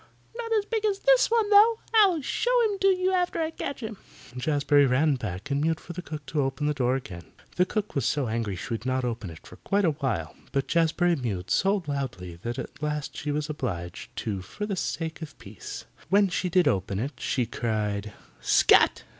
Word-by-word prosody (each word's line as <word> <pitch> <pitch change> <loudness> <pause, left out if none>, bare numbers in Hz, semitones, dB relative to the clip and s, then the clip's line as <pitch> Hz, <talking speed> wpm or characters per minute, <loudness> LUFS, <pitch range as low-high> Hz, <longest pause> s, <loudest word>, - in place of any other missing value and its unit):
"Not 465 -1 -5
as 425 -2 +2
big 445 0 -2
as 410 -2 +1
this - - +4
one, 455 -2 +2
though. 435 +3 +7 0.2
I'll 385 -9 +5
show 485 - -1
him 410 -3 0
to 390 - +3
you 370 -1 +3
after 360 -2 0
I 320 0 0
catch 280 -4 -5
him." 220 -2 -5 0.4
Jazbury 145 +1 +3
ran 140 +4 +3
back 105 -3 -5
and 140 +1 +1
mewed 160 +1 +1
for 175 - -9
the 180 - -5
cook 155 -4 -7
to 150 - -1
open 135 +2 -2
the 150 - +2
door 130 -2 +1
again. 95 -10 -7 0.3
The 180 0 +3
cook 210 +1 -2
was 140 - 0
so 140 +1 0
angry 110 -3 -2
she 90 - -7
would 115 - -4
not 130 0 0
open 115 -5 -3
it 80 -1 -12
for - - -13
quite 200 0 0
a 165 - +4
while, 120 - -3 0.2
but 135 -1 0
Jazbury 170 +1 +2
mewed 100 -8 -4
so 195 0 +2
loudly 125 - -4
that 120 +7 -5
at 135 - -7
last 150 -1 -3
she 150 - -4
was 150 +1 -1
obliged 90 - -5
to 100 -4 -3
for 210 - -6
the 205 -2 -2
sake 165 -2 -3
of 155 -2 -8
peace. 100 0 -9 0.2
When 200 0 +4
she 180 0 -1
did 180 -2 +3
open 95 -6 0
it 130 +8 -2
she 125 0 0
cried, 105 -3 -2 0.3
"Scat!" - - +4
150 Hz, 215 wpm, -27 LUFS, -, 0.4 s, though